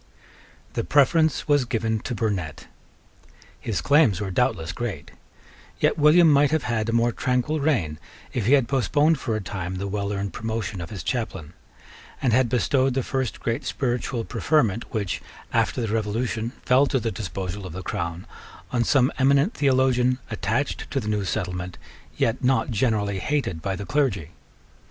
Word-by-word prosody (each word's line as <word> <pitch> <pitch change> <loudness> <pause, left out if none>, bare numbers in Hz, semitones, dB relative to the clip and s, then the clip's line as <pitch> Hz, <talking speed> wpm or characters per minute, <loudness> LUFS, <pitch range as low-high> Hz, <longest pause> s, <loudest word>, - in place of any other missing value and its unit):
The - - -1
preference 150 - +3
was 145 -2 +4
given 115 -2 -1
to 120 - -4
Burnet. 100 -9 -2 0.9
His 110 -5 -2
claims 140 - +4
were 100 -2 -3
doubtless 85 -2 0
great. 105 -9 -5 0.7
Yet - - +2
William 155 +3 +6
might 145 -1 +5
have 155 -3 0
had 115 -2 -1
a - - +1
more 115 +1 +2
tranquil 125 +6 0
reign 105 - 0 0.3
if 115 -5 -1
he 130 - +5
had 135 -4 +4
postponed 145 +3 +2
for 115 -4 -2
a 110 - -2
time 95 -1 -5
the 100 +2 -3
well 100 0 -2
earned 100 -1 -3
promotion 110 -3 -3
of 85 - -6
his 100 -7 -6
chaplain, 95 - -3 0.7
and 125 -4 +1
had 125 0 +3
bestowed 130 +1 +2
the 135 - +1
first 130 -4 -2
great 115 0 -2
spiritual 120 -2 -2
preferment, 115 -2 0
which, 100 -5 -2 0.3
after - - +1
the 110 -2 -2
Revolution, 115 +1 -1 0.2
fell 130 +3 +5
to 135 - +1
the 115 -1 -2
disposal 95 -1 -5
of 85 - -9
the 95 +2 -6
Crown, 85 +1 -4 0.5
on 120 -2 +2
some 130 0 +3
eminent 140 - +4
theologian, 130 -2 +2
attached 115 +6 -2
to 135 - -1
the 105 -4 -4
new 105 -1 0
settlement, 90 0 -3 0.4
yet 115 +3 0
not 130 +1 +2
generally 105 -4 0
hated 135 - -1
by 95 +3 -2
the 100 +1 -6
clergy. 105 - 0
115 Hz, 165 wpm, -24 LUFS, 100-130 Hz, 0.9 s, William